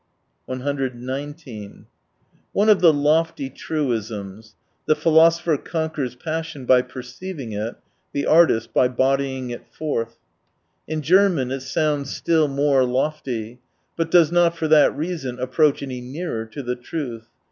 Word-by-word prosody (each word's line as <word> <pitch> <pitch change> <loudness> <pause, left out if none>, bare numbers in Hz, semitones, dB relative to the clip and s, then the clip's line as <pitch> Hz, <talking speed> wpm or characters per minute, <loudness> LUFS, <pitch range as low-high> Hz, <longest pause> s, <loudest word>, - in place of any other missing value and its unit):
119 130 -2 -5 0.7
One 210 +2 +3
of 210 - +5
the 170 -3 +7
lofty 150 -1 +1
truisms 110 -8 -4
— - - -46
"The 155 - +4
philoso 165 +1 +4
pher 155 -5 0
conquers 155 -6 -3
passion 155 -1 -5
by 125 0 +5
perceiving 130 +3 -8
it, 105 +3 -4 0.4
the 140 - -2
artist 155 -9 +4
by 125 - +4
bodying 130 0 0
it 120 - -8
forth." 115 -7 -3 0.7
In 155 0 -3
German 175 -6 +3
it 135 - -2
sounds 145 +1 -1
still 160 -3 +2
more 140 -1 +2
lofty: 125 -3 -2 0.4
but 165 -1 -1
does 165 -2 +5
not 170 -1 +3
for 160 - -1
that 155 -2 +5
reason 150 -6 -3
approach 140 +3 +2
any 130 -2 -5
nearer 125 -3 -5
to 135 +6 -7
the 125 0 -2
truth. 120 -3 -6
140 Hz, 135 wpm, -22 LUFS, 125-160 Hz, 0.7 s, the